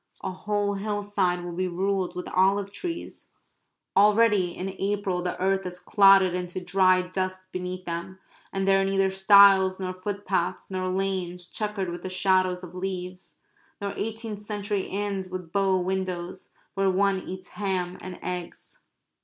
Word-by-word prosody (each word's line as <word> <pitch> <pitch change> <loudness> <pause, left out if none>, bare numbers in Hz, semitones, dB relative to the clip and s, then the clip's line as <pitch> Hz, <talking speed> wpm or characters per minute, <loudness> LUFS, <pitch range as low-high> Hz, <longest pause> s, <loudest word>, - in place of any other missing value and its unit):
A - - -2
whole 205 +1 -1
hillside 200 -3 -1
will 175 - -5
be 185 +2 -1
ruled 190 +1 -1
with 180 - -5
olive 195 +2 +2
trees. 335 - -6 0.7
Already 210 -2 +5
in 190 +2 -5
April 195 -2 -1
the 180 0 -3
earth 195 +1 +1
is 180 0 -6
clotted 195 -1 +5
into 180 0 -3
dry 185 0 +3
dust 185 +1 -3
between 185 0 -4
them. 170 +2 -5 0.3
And 195 0 -1
there 195 0 +5
are - - +2
neither 195 0 +2
stiles 190 -1 +6
nor 185 -1 -3
footpaths, 190 -1 -2
nor 185 0 -2
lanes 185 -2 -2
chequered 210 -1 -3
with 175 - -6
the 185 - -5
shadows 185 -1 +2
of 180 -1 -9
leaves 185 0 -6 0.4
nor 200 -1 -3
eighteenth 220 -1 -4
century 205 -1 -2
inns 195 -1 -3
with 185 -3 -6
bow 195 0 +2
windows, 185 -1 -3 0.2
where 195 0 +2
one 195 +1 +2
eats 185 0 -8
ham 185 -3 -2
and 185 -1 -7
eggs. 180 -1 -6
190 Hz, 155 wpm, -26 LUFS, 185-200 Hz, 0.7 s, stiles